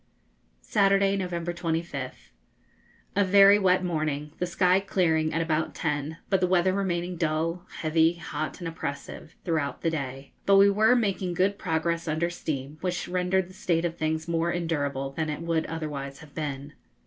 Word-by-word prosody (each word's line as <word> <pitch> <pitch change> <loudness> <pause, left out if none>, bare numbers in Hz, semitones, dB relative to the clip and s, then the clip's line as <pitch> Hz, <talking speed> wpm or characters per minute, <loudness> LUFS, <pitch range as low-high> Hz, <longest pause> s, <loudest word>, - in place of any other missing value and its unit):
Saturday, 195 -1 +3
November 175 -2 -2
25th. 160 - -4 0.8
A 200 - +4
very 200 +1 +7
wet 185 -1 +3
morning, 155 -3 -2
the 180 - 0
sky 180 +1 +3
clearing 165 -5 +1
at 165 - 0
about 160 -1 -1
ten, 150 0 -2
but 195 -2 +1
the 180 - +3
weather 185 0 +3
remaining 180 -2 -1
dull, 165 +2 -1
heavy, 160 +1 +3
hot, 155 -2 -5
and 175 - -5
oppressive, 155 -1 -6
throughout 155 -5 -1
the 165 - +2
day. 135 -3 -5
But 200 0 +6
we 200 +1 +7
were 220 +4 +4
making 195 -6 0
good 195 +3 +1
progress 165 -1 -1
under 160 +2 0
steam, 150 -3 -5
which 180 -1 -2
rendered 180 +1 +1
the 185 - -14
state 170 -2 0
of 170 -1 -2
things 160 0 -2
more 170 0 0
endurable 145 -6 -2
than 155 +2 -2
it 150 +1 -4
would 165 -1 0
otherwise 145 -4 -5
have 150 -1 -14
been. 145 -2 -5
165 Hz, 165 wpm, -27 LUFS, 155-185 Hz, 0.8 s, very